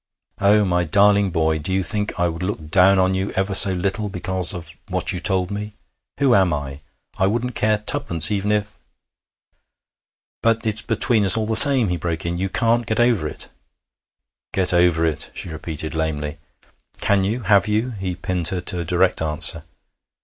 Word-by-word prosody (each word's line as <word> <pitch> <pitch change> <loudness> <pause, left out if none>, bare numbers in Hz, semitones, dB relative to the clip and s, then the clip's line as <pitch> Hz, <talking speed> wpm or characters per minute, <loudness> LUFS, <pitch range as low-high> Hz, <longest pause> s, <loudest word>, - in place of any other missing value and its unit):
Oh, 105 +1 +2
my 90 -1 -1
darling 100 +4 +2
boy! 80 -2 -1
do 80 +5 -5
you 95 0 -1
think 105 +1 -2
I 85 - +1
would 85 0 -6
look 85 -5 -6
down 95 +2 +4
on 95 0 +1
you 95 +1 -3
ever 95 +1 -2
so 95 0 +8
little 100 +4 -3
because 95 -1 -1
of 85 -1 -6
what - - -2
you 90 - -5
told 95 -1 -1
me? 105 +1 -6 0.4
Who 135 -3 +2
am 95 -5 +2
I? 70 -1 -6 0.4
I 95 - +2
wouldn't 120 +4 -3
care 110 -1 0
twopence 105 - +2
even 105 0 -2
if 105 0 -3 0.8
' - - -59
'But 115 0 0
it's 110 0 -1
between 115 -1 0
us 95 +2 +6
all 110 - -2
the 110 +1 -2
same,' 130 -3 +8
he 90 - -2
broke 85 -1 -5
in. 85 +1 -4
'You 95 +1 -3
can't 115 +2 -1
get 110 - -2
over 120 -10 +1
it.' - - -6 1.0
'Get 95 -1 +3
over 85 -2 +2
it!' 80 -3 -3
she - - -5
repeated 80 -1 -5
lamely. 80 -1 -4 0.6
'Can 100 -1 0
you? 110 +6 -3
Have 100 -3 +2
you?' 110 +4 -2
He 95 -5 -6
pinned 90 -1 -2
her 95 - -1
to 90 0 -1
a - - -3
direct 90 +1 0
answer. 75 -1 +2
95 Hz, 190 wpm, -20 LUFS, 85-105 Hz, 1.0 s, so